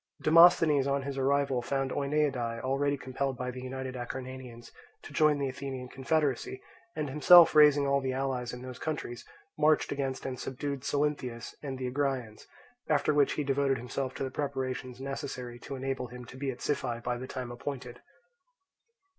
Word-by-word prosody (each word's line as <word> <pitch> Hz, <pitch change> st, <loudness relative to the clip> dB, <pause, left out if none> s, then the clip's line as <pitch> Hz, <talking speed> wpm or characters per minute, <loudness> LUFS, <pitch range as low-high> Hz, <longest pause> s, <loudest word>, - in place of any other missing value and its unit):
Demosthenes 155 Hz, -3 st, +6 dB
on 140 Hz, 0 st, 0 dB
his 140 Hz, 0 st, -4 dB
arrival 135 Hz, -1 st, +2 dB
found 135 Hz, +1 st, -1 dB
Oeniadae 140 Hz, -5 st, 0 dB
already 140 Hz, +2 st, 0 dB
compelled 130 Hz, 0 st, -3 dB
by 125 Hz, 0 st, -3 dB
the 125 Hz, 0 st, -8 dB
united 130 Hz, 0 st, -5 dB
Acarnanians 125 Hz, -1 st, -7 dB, 0.3 s
to -, -, -10 dB
join 155 Hz, -1 st, +4 dB
the 140 Hz, -1 st, -1 dB
Athenian 130 Hz, -1 st, -6 dB
confederacy, 135 Hz, -1 st, -1 dB, 0.4 s
and 150 Hz, -2 st, -2 dB
himself 160 Hz, +5 st, +8 dB
raising 150 Hz, -2 st, +6 dB
all 140 Hz, 0 st, +2 dB
the 130 Hz, -1 st, -1 dB
allies 130 Hz, -2 st, -2 dB
in 125 Hz, 0 st, -8 dB
those 130 Hz, -1 st, -8 dB
countries 145 Hz, -6 st, -4 dB, 0.4 s
marched 155 Hz, 0 st, +3 dB
against 135 Hz, -2 st, -3 dB
and 130 Hz, -2 st, -4 dB
subdued 140 Hz, +1 st, -4 dB
Salynthius 140 Hz, -6 st, -2 dB
and 135 Hz, -3 st, -5 dB
the 130 Hz, -, -4 dB
Agraeans; 130 Hz, -4 st, -2 dB, 0.4 s
after 150 Hz, 0 st, +3 dB
which 145 Hz, -1 st, +3 dB
he 150 Hz, -, -1 dB
devoted 135 Hz, -1 st, +1 dB
himself 130 Hz, +2 st, -4 dB
to -, -, -3 dB
the 130 Hz, -, -3 dB
preparations 130 Hz, -3 st, -3 dB
necessary 130 Hz, -3 st, -5 dB
to 135 Hz, -, -7 dB
enable 135 Hz, -1 st, -3 dB
him 125 Hz, +1 st, -10 dB
to 125 Hz, -, -12 dB
be 135 Hz, +1 st, -3 dB
at 125 Hz, -2 st, -6 dB
Siphae 120 Hz, -5 st, -2 dB
by 125 Hz, 0 st, -1 dB
the 130 Hz, -, -6 dB
time 130 Hz, -2 st, -5 dB
appointed. 125 Hz, -1 st, -6 dB
135 Hz, 170 wpm, -30 LUFS, 125-140 Hz, 0.4 s, himself